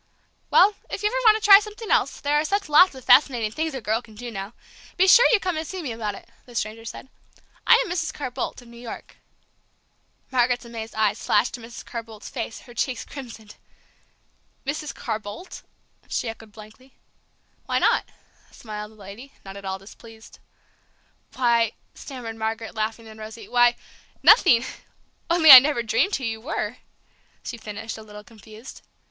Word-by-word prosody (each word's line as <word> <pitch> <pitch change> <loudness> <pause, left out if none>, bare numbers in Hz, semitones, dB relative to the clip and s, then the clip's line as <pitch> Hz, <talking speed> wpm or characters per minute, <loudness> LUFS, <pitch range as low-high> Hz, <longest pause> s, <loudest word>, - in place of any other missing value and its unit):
"Well, 405 +3 +5 0.2
if 400 - -5
you 420 - +3
ever - - -5
want 435 -1 +7
to 435 - -5
try 395 -1 +10
something 425 +1 -8
else, - - +1
there 290 0 -1
are - - 0
such 400 +5 -1
lots 310 +2 +6
of 260 - -12
fascinating 240 -6 +4
things 315 +4 -3
a 265 - -5
girl 220 +3 -1
can 220 -3 -17
do 240 +2 -8
now! 195 +1 -7 0.4
be 375 +1 +4
sure 480 +6 +8
you 465 - +4
come 365 -4 -2
and 315 0 -4
see 375 -2 -6
me 265 - -4
about 215 -3 -4
it," - - -14 0.2
the 245 - -14
stranger 225 +1 -4
said. 230 - -9 0.6
"I 470 - +7
am - - -7
Mrs. 335 -3 -2
Carr 270 -5 -6
Boldt, 250 0 -5
of - - -18
New 235 0 -14
York." 235 - -10 1.1
Margaret's 245 -1 +1
amazed 225 -1 -8
eyes 215 -1 0
flashed 210 +3 +2
to 245 - -7
Mrs. 230 +1 -11
Carr 235 - -5
Boldt's 220 -2 -12
face; 230 -3 -6
her 240 - -15
cheeks 245 0 -3
crimsoned. 230 -6 -11 1.1
"Mrs. 300 +1 -3
Carr 215 - -4
Boldt!" 210 - -10 0.5
she - - -2
echoed 225 -1 -8
blankly. 220 +5 -15 0.7
"Why - - 0
not?" - - +2 0.4
smiled 210 -1 -9
the - - -20
lady, 210 +7 -12
not 195 0 -9
at 200 0 -10
all 190 0 -3
displeased. 220 +3 -15 1.0
"Why," 235 -3 +2 0.2
stammered 240 -4 -8
Margaret, 225 0 -4
laughing 220 +1 -4
and 220 0 -13
rosy, 220 +1 -10
"why, 240 0 +4 0.5
nothing 260 - +6 0.6
only 335 -3 +7
I 260 - +14
never 275 -2 -1
dreamed 225 - +1
who 265 - -5
you 225 -2 -3
were!" 285 +8 -4 0.7
she - - -6
finished, 220 0 -7
a - - -10
little 210 -1 -12
confused. 220 +1 -13
235 Hz, 180 wpm, -23 LUFS, 220-285 Hz, 1.1 s, I